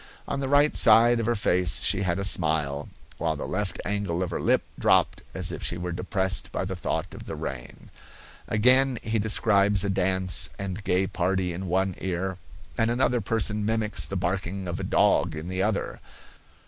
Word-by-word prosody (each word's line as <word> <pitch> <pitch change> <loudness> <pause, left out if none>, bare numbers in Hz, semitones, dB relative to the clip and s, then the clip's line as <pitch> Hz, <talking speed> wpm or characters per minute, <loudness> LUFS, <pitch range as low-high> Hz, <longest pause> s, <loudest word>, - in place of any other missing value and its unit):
On 140 - -3
the 135 -1 -3
right 145 +2 +3
side 115 +2 +5
of 115 - -2
her 120 - +1
face 90 -3 +2
she 100 - +3
had 90 -2 -1
a 100 - -3
smile, 75 -6 +1 0.3
while 80 0 0
the 75 - -5
left 100 0 -3
angle 100 -4 -1
of 90 - -5
her - - -3
lip - - +2 0.2
dropped - - +3
as - - +2
if - - -6
she 85 - -2
were 90 0 -4
depressed 95 +2 -2
by - - -3
the 95 0 -4
thought 90 - -3
of - - -10
the - - -6
rain. 65 -2 -8 0.6
Again, 125 +4 +3
he 110 0 -1
describes 100 -2 +2
a 100 - -1
dance 95 -1 -1
and 100 +1 -5
gay 95 0 +1
party 90 0 -1
in 95 +2 -6
one 95 +2 0
ear, 95 0 -3 0.4
and 115 0 +2
another 120 0 +1
person 105 0 -1
mimics 110 0 +1
the 100 - -5
barking 95 +1 -3
of 85 0 -4
a - - -4
dog - - +2
in 80 +3 -6
the 95 0 -1
other. 105 0 -2
95 Hz, 190 wpm, -25 LUFS, 90-110 Hz, 0.6 s, side